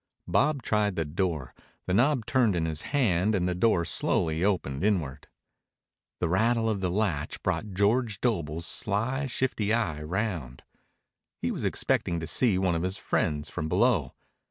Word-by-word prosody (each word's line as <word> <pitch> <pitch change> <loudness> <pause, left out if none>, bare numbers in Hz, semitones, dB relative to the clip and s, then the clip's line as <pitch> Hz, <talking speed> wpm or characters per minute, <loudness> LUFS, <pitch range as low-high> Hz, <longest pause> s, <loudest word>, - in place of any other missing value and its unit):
Bob 135 - +2
tried 105 -2 +1
the 80 - -1
door. 80 -5 -2 0.3
The 90 - -1
knob 125 +3 +3
turned 120 -4 +2
in 85 -1 0
his 80 -2 -2
hand 105 - +1
and 90 -2 0
the 90 - 0
door 90 -2 +2
slowly 80 +1 0
opened 90 -8 0
inward. 90 -11 -1 0.9
The 90 - 0
rattle 115 +6 +2
of 105 -3 -1
the 90 - 0
latch 85 -6 -1
brought 105 -3 -2
George 105 +1 +1
Doble's 85 -9 -1
sly, 120 +8 0
shifty 115 -4 -1
eye 85 -10 0
round. 85 - -3 0.7
He - - -2
was - - -4
expecting 85 -1 0
to 80 - -4
see 110 +1 +2
one 95 -2 +1
of 80 - -1
his 95 +2 -1
friends 75 0 -1
from 80 - -3
below. 95 - +2
95 Hz, 160 wpm, -28 LUFS, 80-115 Hz, 0.9 s, knob